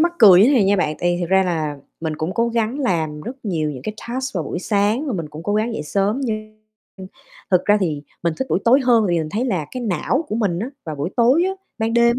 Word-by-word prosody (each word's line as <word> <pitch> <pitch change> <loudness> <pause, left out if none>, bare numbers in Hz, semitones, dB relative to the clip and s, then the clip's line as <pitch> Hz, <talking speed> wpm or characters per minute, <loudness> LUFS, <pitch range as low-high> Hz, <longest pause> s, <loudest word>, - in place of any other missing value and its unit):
mắc 340 +1 +3
cười 190 -4 +8
như 210 - +7
thế 285 - +4
này 230 -7 +4
nha 200 +1 +3
bạn, 155 -4 0
tại 175 0 +1
vì - - -5
thật 175 - -1
ra 190 0 +5
là 155 -5 -2 0.2
mình 160 -2 -3
cũng 160 +5 -3
cố 235 0 +1
gắng 230 +3 -1
làm 160 - -1
rất 245 +8 -6
nhiều 160 -6 -1
những 130 -3 -8
cái 215 +8 -4
task 260 0 -3
vào 165 -4 -1
buổi 170 - -4
sáng 210 - 0
và 265 - -2
mình 165 -6 -4
cũng 155 +2 -9
cố 205 +3 -1
gắng 220 +3 0
dậy - - -3
sớm 200 - 0
nhưng 215 -3 -4 0.4
nhưng 190 - -8 0.4
thực 180 -1 +3
ra 205 0 +4
thì 150 -5 -1 0.2
mình 170 -2 0
thích 265 - -2
buổi - - +3
tối 255 +4 +5
hơn 235 -3 +4
tại 175 - +1
vì - - +2
mình 155 -1 -3
thấy 225 +6 -1
là 180 - -1
cái 255 - -5
não 235 - 0
của - - -3
mình 200 -7 0
á, 235 +8 -4
vào 155 -2 -5
buổi 145 +6 -3
tối 255 +9 +4
á 380 - +1 0.3
ban 225 +1 0
đêm 235 +1 +4
205 Hz, 285 wpm, -20 LUFS, 170-235 Hz, 0.4 s, cười